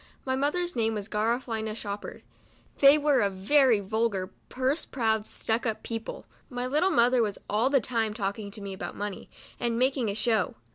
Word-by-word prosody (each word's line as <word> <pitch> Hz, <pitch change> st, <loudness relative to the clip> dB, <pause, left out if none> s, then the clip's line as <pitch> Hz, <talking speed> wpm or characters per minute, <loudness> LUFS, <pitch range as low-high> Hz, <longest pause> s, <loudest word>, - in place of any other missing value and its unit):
My 260 Hz, -1 st, 0 dB
mother's 345 Hz, +6 st, -1 dB
name 225 Hz, -2 st, +1 dB
was 205 Hz, -1 st, -4 dB
Garafelina 220 Hz, 0 st, -1 dB
Shoppard. 205 Hz, -2 st, -6 dB, 0.6 s
They 280 Hz, +1 st, +8 dB
were 290 Hz, -4 st, +3 dB
a 200 Hz, -, +2 dB
very 230 Hz, +5 st, +3 dB
vulgar, 200 Hz, -2 st, -1 dB, 0.2 s
purse 260 Hz, +5 st, 0 dB
proud, 220 Hz, -4 st, 0 dB
stuck 225 Hz, +2 st, -1 dB
up 220 Hz, -, -3 dB
people. 225 Hz, -1 st, -5 dB, 0.2 s
My 245 Hz, 0 st, -3 dB
little 300 Hz, +8 st, +2 dB
mother 245 Hz, -3 st, +4 dB
was 210 Hz, -3 st, -1 dB
all 220 Hz, +5 st, +2 dB
the 275 Hz, -1 st, +4 dB
time 225 Hz, -2 st, -1 dB
talking 200 Hz, -1 st, -3 dB
to 205 Hz, +1 st, -9 dB
me 200 Hz, -1 st, -5 dB
about 190 Hz, -, -6 dB
money, 205 Hz, -1 st, -5 dB, 0.3 s
and 235 Hz, -1 st, 0 dB
making 255 Hz, -2 st, +1 dB
a 200 Hz, -, -2 dB
show. 220 Hz, -2 st, +1 dB
225 Hz, 180 wpm, -28 LUFS, 210-260 Hz, 0.6 s, They